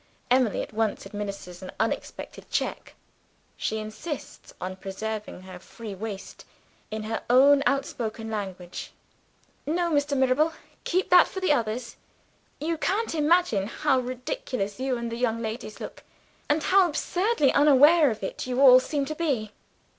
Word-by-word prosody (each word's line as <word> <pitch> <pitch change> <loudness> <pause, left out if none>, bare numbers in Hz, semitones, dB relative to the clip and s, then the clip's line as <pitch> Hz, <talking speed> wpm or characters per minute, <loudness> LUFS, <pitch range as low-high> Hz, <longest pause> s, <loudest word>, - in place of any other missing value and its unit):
Emily 250 -4 +3
at - - -10
once 220 -2 -1
administers 200 -3 -6
an 185 - -7
unexpected 225 - -4
check; - - -3 0.6
she 220 - -2
insists 220 +8 -7
on 185 +1 -4
preserving 200 -1 -6
a 185 -1 -9
free 215 +2 -9
waist, 200 0 -7 0.5
in 215 0 -4
her 220 +1 -3
own 275 +3 +6
outspoken 225 -5 -2
language. 190 -4 -6 0.7
"No, 340 +2 0
Mr. 285 -1 +1
Mirabel, 265 +5 +3 0.3
keep 370 +1 0
that 360 0 +8
for 380 - -6
the 375 -4 +1
others. 235 -1 -2 0.6
You 320 +1 -2
can't 415 +5 0
imagine 305 - +2
how 255 +3 +1
ridiculous 255 - -4
you 260 -1 -1
and 235 -1 -4
the 230 - -4
young 235 -2 0
ladies 220 -1 -5
look, - - -8 0.5
and 300 +1 +2
how 375 -2 +5
absurdly 350 - +1
unaware 295 +2 +6
of 220 -3 -5
it 190 - -4
you 250 0 -1
all 255 -2 +9
seem 280 +2 -2
to 310 - -4
be." 275 -10 -1
250 Hz, 145 wpm, -26 LUFS, 215-295 Hz, 0.7 s, all